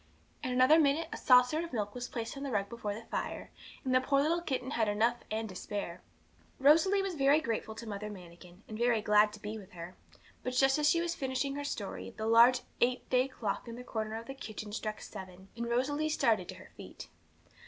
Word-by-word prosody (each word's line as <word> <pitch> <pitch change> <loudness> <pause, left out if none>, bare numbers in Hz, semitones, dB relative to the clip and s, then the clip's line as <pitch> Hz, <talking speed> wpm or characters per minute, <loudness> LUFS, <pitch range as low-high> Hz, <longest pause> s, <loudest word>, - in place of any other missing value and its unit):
In 255 - -3
another 255 +6 +6
minute 310 +2 +2
a - - -4
saucer 250 +4 +5
of 335 - -8
milk 205 -3 -2
was 245 0 -5
placed 230 +1 -5
on 275 - -7
the 280 - -3
rug 200 -4 -1
before 210 -3 -4
the 225 - -8
fire, - - -4 0.3
and 260 - +1
the 255 - +5
poor 275 +1 +2
little 335 +3 +1
kitten 260 -5 -3
had 225 -5 +1
enough 225 +4 +2
and 220 +1 -2
to - - -8
spare. 185 -2 -5 0.6
Rosalie 330 +8 +5
was 385 -2 -2
very 280 0 +4
grateful 225 -5 -3
to 230 - -8
Mother 210 0 -5
Manikin, 180 0 -13
and 215 0 -7
very 235 -3 +2
glad 210 0 +5
to 210 - -10
be 210 +1 -6
with 195 -1 -14
her; 175 +1 -8 0.5
but 255 - -3
just 270 +3 +3
as 300 0 +4
she 335 - +3
was 340 0 -1
finishing 270 -1 -2
her 285 +1 -4
story, 225 -3 -5
the 220 - -3
large 235 +3 +6 0.2
eight 250 +1 +1
day 255 +1 +3
clock 230 -4 -4
in 230 - -6
the 250 - -8
corner 220 -2 -4
of 230 - -8
the 270 - -6
kitchen 215 -5 -7
struck 215 -1 -4
seven, 190 0 -10
and 235 0 -4
Rosalie 290 +6 0
started 220 -11 +1
to - - -6
her - - -14
feet. - - -10
235 Hz, 225 wpm, -32 LUFS, 210-275 Hz, 0.6 s, another